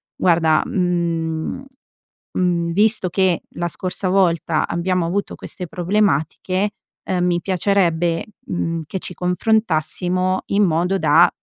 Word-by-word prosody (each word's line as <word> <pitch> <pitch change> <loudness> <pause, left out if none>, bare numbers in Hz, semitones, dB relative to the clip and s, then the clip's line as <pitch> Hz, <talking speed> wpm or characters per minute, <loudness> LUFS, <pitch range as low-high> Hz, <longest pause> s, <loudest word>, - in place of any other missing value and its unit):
guarda, 165 -3 +3
mhmm, 170 +3 -1 0.7
mhmm, 170 -2 +1
visto 205 0 +2
che, 185 -1 +1
la 175 - -1
scorsa 185 +2 -3
volta, 170 -4 +2
abbiamo 180 0 0
avuto 195 +4 -2
queste 180 -2 -8
problematiche, 185 +1 0 0.4
uhm, 180 -2 +1
mi 175 -1 +1
piacerebbe, 175 -3 +1 0.2
mhmm, 165 -1 -2
che 190 - -4
ci 180 - -6
confrontassimo 185 -1 0
in 205 +1 +2
modo 180 +2 +1
da, - - +5
180 Hz, 115 wpm, -20 LUFS, 170-190 Hz, 0.7 s, da